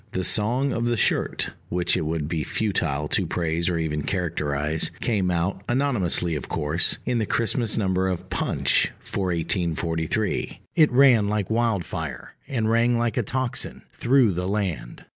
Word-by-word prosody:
The 95 - -1
Song 120 +8 +2
of 115 - -1
the 120 0 +1
Shirt, - - +1 0.2
which 90 0 +1
it 80 - -1
would 80 -2 -2
be 80 -1 -2
futile 80 -10 -1
to - - +1
praise 85 0 0
or 85 - 0
even 75 -2 -1
to - - -7
characterize, 75 -4 -1
came 100 -6 0
out, 90 +2 -1
anonymously 120 -10 +1
of 75 - -4
course, 75 +4 0
in 125 -2 0
the 110 - -1
Christmas 115 0 +1
number 95 -3 +1
of 90 -2 -3
Punch - - +1
for 100 - -3
1843: 85 -2 -1
it 155 -3 +5
ran 120 -5 +5
like 105 -1 -1
wildfire, 90 - -2
and 115 -5 -1
rang 120 +1 +3
like 115 -1 0
a 125 - +2
tocsin, 130 +3 -3
through 125 -3 +3
the 90 +1 -2
land. 95 - -3
95 Hz, 160 wpm, -24 LUFS, 80-115 Hz, 0.2 s, it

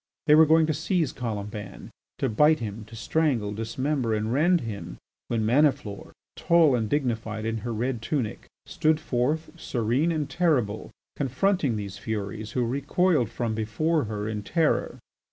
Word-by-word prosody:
They 150 - +5
were 155 +1 +7
going 160 +1 +5
to 155 - 0
seize 165 -2 0
Colomban, 105 -3 -6 0.3
to - - 0
bite 150 +8 +4
him, 110 -1 -6
to 115 +2 -12
strangle, 115 -4 0
dismember 115 +2 -1
and 110 +2 -1
rend 170 +5 +3
him, 100 - -6 0.3
when 115 -2 0
Maniflore, 130 -4 +1 0.2
tall 165 -4 +4
and 115 -3 0
dignified 115 -6 -1
in 115 0 -1
her 120 +3 -4
red 120 +1 -2
tunic, 120 -3 -3 0.2
stood 155 0 +1
forth, 150 +3 -1
serene 125 +4 0
and 155 -3 -1
terrible, 145 - 0 0.3
confronting 145 - +1
these 100 -2 -5
furies 105 0 -4
who 125 -2 +1
recoiled 140 - +1
from 115 -2 -2
before 120 +8 0
her 105 -1 -4
in 105 -1 -3
terror. 160 - 0
120 Hz, 155 wpm, -26 LUFS, 110-155 Hz, 0.3 s, were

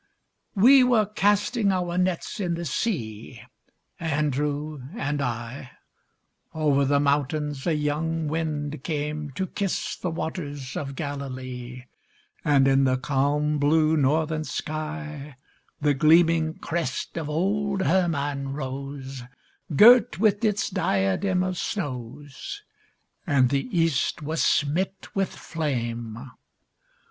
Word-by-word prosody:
We 255 +7 +7
were 240 -4 +4
casting 205 +1 +1
our 180 -2 -1
nets 180 +1 -1
in 175 -4 -1
the 170 0 -5
sea, 120 - -3 0.6
Andrew 150 -1 -1 0.2
and 145 -9 -1
I; 125 +1 -4 0.8
Over 145 -3 +2
the 140 +1 +3
mountains 145 0 0
a 165 - +2
young 155 +2 -1
wind 150 -2 -3
came 150 -1 -3
To 190 - -2
kiss 195 +1 -2
the 180 - -3
waters 145 -5 -5
of 140 -2 -4
Galilee, 130 -4 -6 0.6
And 140 -2 +4
in 135 0 +4
the 130 0 +2
calm 145 +3 0
blue 155 +2 +3
northern 155 +2 +1
sky 150 -2 -5 0.5
The 145 -1 +3
gleaming 160 +2 +4
crest 165 -6 -3
of 160 -3 -3
old 195 +4 0
Hermon 145 -7 0
rose 135 -1 -6 0.5
Girt 225 - +7
with 210 0 +2
its 210 -2 +1
diadem 175 - +1
of 185 -1 -2
snows. 145 - -5 0.6
And 135 -5 +4
the 140 - 0
east 165 - +1
was 155 +2 -1
smit 170 +7 0
with 195 -1 0
flame. 120 -5 -4
150 Hz, 115 wpm, -25 LUFS, 140-170 Hz, 0.8 s, We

